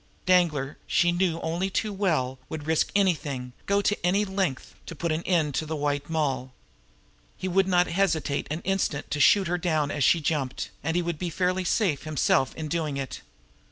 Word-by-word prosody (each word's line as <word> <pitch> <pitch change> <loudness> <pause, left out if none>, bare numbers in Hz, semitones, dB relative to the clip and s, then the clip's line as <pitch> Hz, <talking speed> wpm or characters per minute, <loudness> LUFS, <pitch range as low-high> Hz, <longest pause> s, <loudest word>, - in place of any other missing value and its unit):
Danglar, 165 -7 +2
she 175 0 +3
knew 175 -2 0
only 170 +4 -1
too 210 +2 -1
well, 155 -10 0
would 155 -2 -6
risk 160 0 +1
anything, 150 -10 0
go 200 0 +2
to 205 - +2
any 195 +4 +2
length, 190 -9 -2
to 165 - -7
put 170 +1 -2
an 155 +1 0
end 160 -6 +2
to 155 - -1
the 160 - -2
White 145 0 -2
Moll. 135 -5 -1 0.8
He 185 - -4
would 190 +1 +2
not 180 -1 +4
hesitate 165 -6 0
an 155 +3 -3
instant 190 -6 -1
to 145 - -1
shoot 195 +5 +5
her 180 +1 -1
down 155 -4 0
as 145 - -1
she 170 - +5
jumped 145 -4 -2
and 165 +2 -1
he 175 - +2
would 170 -3 -3
be 180 - -2
fairly 185 +2 0
safe 180 -4 +1
himself 150 -3 +1
in 155 - -5
doing 155 -3 -2
it. 135 -1 -5
165 Hz, 195 wpm, -26 LUFS, 145-185 Hz, 0.8 s, shoot